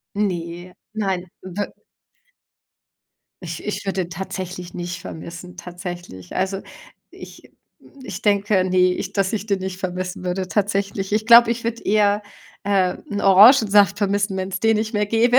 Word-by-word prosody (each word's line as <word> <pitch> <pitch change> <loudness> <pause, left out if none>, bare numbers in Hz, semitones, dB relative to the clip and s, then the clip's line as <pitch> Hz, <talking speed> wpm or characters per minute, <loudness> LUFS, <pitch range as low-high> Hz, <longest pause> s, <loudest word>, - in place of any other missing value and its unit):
Ne, 180 -3 -3 0.2
nein. 195 -4 -1 0.2
We 190 +2 -4 1.7
Ich 165 -2 -6
ich 210 - -3
würde 195 -1 -1
den 175 - -12
tatsächlich 180 0 -6
nicht 175 0 -5
vermissen 170 +2 -9
tatsächlich. 175 - -8
Also 190 +1 -1 0.5
ich - - -13 0.5
ich 185 -2 -7
denke, 200 -2 +2
ne, 185 0 +4
ich 190 +1 -5
dass 195 -2 0
ich 215 -1 -3
den 200 -2 +1
nicht 190 -1 -5
vermissen 185 0 -4
würde 185 +1 -2
tatsächlich. 200 -1 -1
Ich 215 +1 +1
glaube, 235 0 +8
ich 235 0 -2
würde 230 0 -3
eher, 205 0 +3 0.4
äh, 195 -2 +1
'n 205 - -2
Orangensaft 205 -1 +6
vermissen, 200 -1 0
wenn's 190 0 -3
den 225 -1 +3
nicht 220 +1 -2
mehr 210 0 +1
gäbe. 235 +4 +4
195 Hz, 150 wpm, -21 LUFS, 180-205 Hz, 1.7 s, glaube